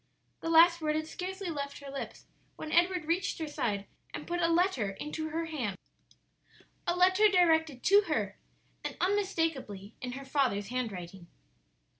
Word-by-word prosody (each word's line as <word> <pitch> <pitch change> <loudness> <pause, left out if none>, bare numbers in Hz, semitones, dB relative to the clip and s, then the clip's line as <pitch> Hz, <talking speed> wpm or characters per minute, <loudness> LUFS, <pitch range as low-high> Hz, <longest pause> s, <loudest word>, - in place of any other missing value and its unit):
The 330 - -4
last 335 +1 +6
word 305 -1 0
had 310 0 -1
scarcely 370 +2 -5
left 280 -2 -4
her 280 -1 -9
lips 275 - -7 0.3
when 310 - -7
Edward 350 -1 +3
reached 340 +4 0
her 320 - -3
side 205 -8 -2 0.3
and - - -6
put 350 0 -2
a 335 - +4
letter 335 - +2
into 300 +10 -5
her 330 +2 -2
hand 250 - -3 1.1
a 345 - +2
letter 375 +4 +5
directed 320 -8 +3
to 400 +2 +6
her, - - -1 0.4
and - - -4
unmistakably 325 - -1
in 250 -1 -4
her 275 +1 -7
father's 255 -8 0
handwriting. 195 -8 -5
315 Hz, 155 wpm, -31 LUFS, 255-350 Hz, 1.1 s, last